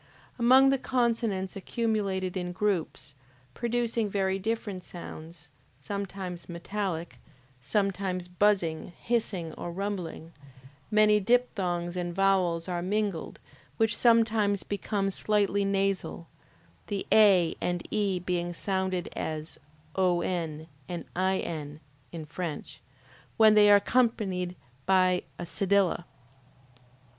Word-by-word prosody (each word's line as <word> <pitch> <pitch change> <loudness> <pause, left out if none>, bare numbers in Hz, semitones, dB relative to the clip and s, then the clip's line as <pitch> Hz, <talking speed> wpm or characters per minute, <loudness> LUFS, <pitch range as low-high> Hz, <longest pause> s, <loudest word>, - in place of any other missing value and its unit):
Among 260 +3 +6
the 275 - +1
consonants 230 -7 0
accumulated 195 -3 -1
in 180 -1 -3
groups, 185 -6 -2 0.4
producing 235 - -1
very 195 -1 0
different 205 -3 -3
sounds, 160 -2 -10 0.3
sometimes 190 +2 -6
metallic, 175 -1 -4 0.4
sometimes 190 - -1
buzzing, 180 -3 +1
hissing 195 -9 -1
or 175 - -6
rumbling, 180 -3 -5 0.6
many 210 -1 +5
diphthongs 190 -6 0
and 175 -1 -3
vowels 185 -3 +2
are 175 -1 -2
mingled, 200 -2 -2 0.4
which 225 0 +2
sometimes 225 -4 +3
become 200 -1 -2
slightly 205 0 +1
nasal, 195 -3 -1 0.6
the 200 -1 -3
A 195 -6 +6
and 175 -1 -2
E 205 -3 +1
being 175 -1 -2
sounded 190 0 -2
as 155 0 -5 0.4
ON 175 -4 0 0.2
and 175 -1 -5
IN, 170 -5 -2 0.3
(in 160 -2 -6
French,) 155 0 -6 0.6
when 220 -1 +7
they 210 -1 +7
are 205 - +9
accompanied 200 -6 0 0.3
by 185 -1 +4 0.2
a - - -5
cedilla. 190 +1 +1
190 Hz, 105 wpm, -28 LUFS, 175-210 Hz, 0.6 s, are